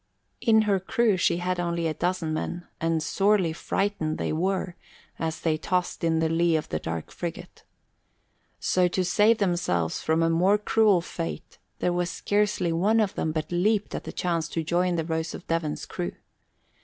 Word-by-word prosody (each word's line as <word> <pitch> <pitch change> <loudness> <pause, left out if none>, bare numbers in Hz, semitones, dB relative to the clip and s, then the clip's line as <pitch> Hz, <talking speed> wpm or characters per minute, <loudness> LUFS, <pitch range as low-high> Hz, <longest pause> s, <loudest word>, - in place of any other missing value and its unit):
In 220 -2 +5
her 200 -2 +2
crew 220 +2 +2
she 175 -1 +2
had 180 0 -1
only 170 -1 -1
a 160 - 0
dozen 170 0 -1
men, 175 +2 -3
and 165 -1 0
sorely 195 -4 +2
frightened 165 -3 -1
they - - -2
were, 185 +2 -1 0.4
as 160 -1 -3
they 160 -2 +1
tossed 180 +1 -1
in 165 -1 +2
the 160 0 +2
lee 165 +1 +2
of 155 - -2
the 80 - -2
dark 80 0 -5
frigate. 175 +1 -7 1.0
So 180 -1 +2
to 180 +1 -1
save 210 +5 +4
themselves 170 - 0
from 160 +1 +1
a 165 - +3
more 185 +5 +4
cruel 210 -3 +3
fate 80 - -6 0.2
there 180 - 0
was 175 0 0
scarcely 205 -5 0
one 205 +7 +3
of 210 -3 +1
them 155 - -1
but 155 0 -3
leaped 205 +4 +1
at - - -4
the - - -5
chance 170 -2 -1
to 165 - -2
join 175 +2 +1
the 165 -2 -1
Rose 160 0 -2
of - - -10
Devon's 165 -2 -2
crew. 175 -1 -4
175 Hz, 180 wpm, -26 LUFS, 160-190 Hz, 1.0 s, In